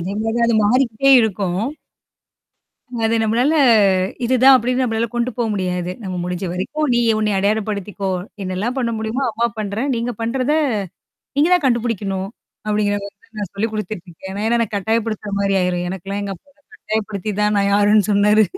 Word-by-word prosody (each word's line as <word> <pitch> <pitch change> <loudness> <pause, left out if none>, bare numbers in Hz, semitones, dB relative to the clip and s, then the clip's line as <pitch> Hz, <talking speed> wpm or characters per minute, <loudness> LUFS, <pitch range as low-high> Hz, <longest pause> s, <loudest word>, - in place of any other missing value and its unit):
அதே 190 +4 -4
மாரி 225 +1 -1
தான் 235 - +3
அது 225 - +3
மாறிக்கிட்டே 250 +2 +2
இருக்கும். 195 -3 -1 1.4
அது 225 +1 +2
நம்மளால 235 +7 +2 0.7
இதுதான் 260 +2 +6
அப்டின்னு 250 +2 0
நம்மளால 225 0 0
கொண்டு 240 +1 0
போ 240 - 0
முடியாது. 180 -2 -2
நம்ம 190 -3 -5
முடிஞ்ச 180 +1 -3
வரைக்கும் 300 +12 -2
நீ 240 - +3 0.2
உனைைய 210 -2 +1
அடையாளப்படுத்திக்கோ! 205 -1 -1 0.3
என்னல்லாம் 195 +8 -3
பண்ண 235 -2 0
முடியுமோ, 220 +5 -2
அம்மா 230 +2 0
பண்றேன். 215 +6 -2
நீங்க 235 +1 -2
பண்றத. 255 +4 0 0.8
நீங்க 295 +4 +4
தான் 355 - +1
கண்டுபிடிக்கணும். 210 -6 -1 0.4
அப்படிங்கிற 210 -1 +1
மாரி 200 - -9
தான் 225 - -28
நான் 200 - -4
சொல்லிக் 220 +2 -2
குடுத்துட்டுருக்கேன். 190 -4 -6
ஏனா 205 +2 -3
ஏன்னா 235 +1 +2
எனக்கு 220 -3 -1
கட்டாயப்படுத்துற 220 0 -1
மாரி 195 0 +1
ஆயிரும். 180 -1 -1
எனக்கெல்லாம் 195 +2 -5
எங்க 200 -1 -4
அப்பா 285 - -29 0.3
கட்டாயபயப்படுத்தி 215 - -3
தான் 210 0 +2
நான் 200 0 +2
யாருன்னு 205 0 +4
சொன்னாரு. 210 +2 +4
215 Hz, 160 wpm, -19 LUFS, 195-235 Hz, 1.4 s, இதுதான்